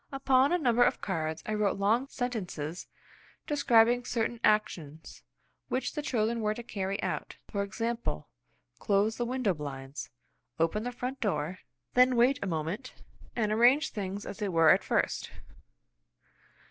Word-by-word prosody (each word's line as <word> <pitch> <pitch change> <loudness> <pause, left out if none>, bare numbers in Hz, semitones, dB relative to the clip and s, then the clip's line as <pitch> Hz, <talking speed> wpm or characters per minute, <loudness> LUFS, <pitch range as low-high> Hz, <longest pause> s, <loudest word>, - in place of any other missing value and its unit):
Upon 270 0 +3
a 355 - +3
number 245 -7 +2
of 245 - +4
cards 160 -4 -3
I 215 - -2
wrote 210 -2 +1
long 220 +7 +2
sentences 185 - -4 0.6
describing 245 -5 +4
certain 235 -1 -2
actions 160 -8 0 0.5
which 255 - -2
the 300 - -3
children 230 -4 0
were 215 0 0
to 240 - -7
carry 195 -4 -3
out; - - -3 0.2
for 200 - -1
example, 230 - -3 0.5
"Close 205 +2 +1
the 240 - -1
window 250 -5 0
blinds; 140 -2 -7 0.5
open 165 +7 +1
the 245 - -2
front 250 +2 -5
door; 185 -3 -1 0.3
then 250 0 +5
wait 255 +4 +4
a 200 - -2
moment, 170 - -3 0.4
and 215 -3 0
arrange 245 +8 +4
things 200 -1 -4
as 205 - -7
they 205 -2 -1
were 165 -3 +5
at - - +4
first." - - 0
215 Hz, 145 wpm, -30 LUFS, 190-245 Hz, 0.6 s, then